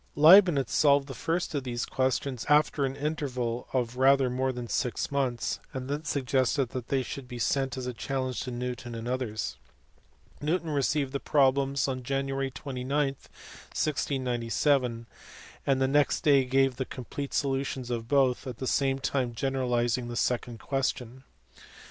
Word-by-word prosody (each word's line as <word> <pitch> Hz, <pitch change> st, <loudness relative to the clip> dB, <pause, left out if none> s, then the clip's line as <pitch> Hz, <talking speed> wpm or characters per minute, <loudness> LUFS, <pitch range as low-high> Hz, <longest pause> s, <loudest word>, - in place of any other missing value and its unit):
Leibnitz 160 Hz, -2 st, +7 dB
solved 140 Hz, -2 st, +4 dB
the 135 Hz, -, -6 dB
first 165 Hz, +8 st, -2 dB
of 140 Hz, -3 st, -1 dB
these 120 Hz, -2 st, -3 dB
questions 130 Hz, -2 st, -1 dB
after 150 Hz, -1 st, +3 dB
an 135 Hz, 0 st, -3 dB
interval 130 Hz, -6 st, -3 dB
of 125 Hz, -1 st, -1 dB
rather 135 Hz, -1 st, +4 dB
more 130 Hz, +1 st, 0 dB
than 125 Hz, -1 st, -6 dB
six 125 Hz, +3 st, -1 dB
months, 130 Hz, -4 st, -1 dB, 0.2 s
and 130 Hz, -1 st, -4 dB
then 145 Hz, +2 st, -3 dB
suggested 130 Hz, -2 st, +1 dB
they 130 Hz, +1 st, -1 dB
should 130 Hz, +1 st, -7 dB
be 125 Hz, -1 st, -7 dB
sent 135 Hz, +3 st, 0 dB
as 130 Hz, -, -4 dB
a 125 Hz, -, -3 dB
challenge 130 Hz, 0 st, -3 dB
to 130 Hz, -, -4 dB
Newton 120 Hz, -1 st, -5 dB
and 115 Hz, +1 st, -5 dB
others. 125 Hz, -, -3 dB, 0.8 s
Newton 160 Hz, +2 st, -1 dB
received 140 Hz, -1 st, 0 dB
the 140 Hz, -, -1 dB
problems 140 Hz, -1 st, +2 dB
on 130 Hz, -1 st, -2 dB
Jan. 135 Hz, +2 st, -2 dB
29, 135 Hz, -1 st, -4 dB
1697, 135 Hz, -3 st, -1 dB, 0.6 s
and 135 Hz, -1 st, +3 dB
the 135 Hz, -, +2 dB
next 145 Hz, +2 st, +2 dB
day 140 Hz, -4 st, +4 dB
gave 135 Hz, 0 st, +2 dB
the 130 Hz, -, -2 dB
complete 135 Hz, +3 st, -6 dB
solutions 135 Hz, -2 st, -1 dB
of 115 Hz, -1 st, -3 dB
both, 135 Hz, 0 st, +2 dB
at 125 Hz, -3 st, -6 dB
the 130 Hz, -, -4 dB
same 135 Hz, +1 st, +1 dB
time 130 Hz, -3 st, -1 dB
generalizing 125 Hz, -2 st, 0 dB
the 120 Hz, -, -5 dB
second 120 Hz, -1 st, -1 dB
question. 130 Hz, -1 st, -3 dB
130 Hz, 155 wpm, -28 LUFS, 125-140 Hz, 0.8 s, Leibnitz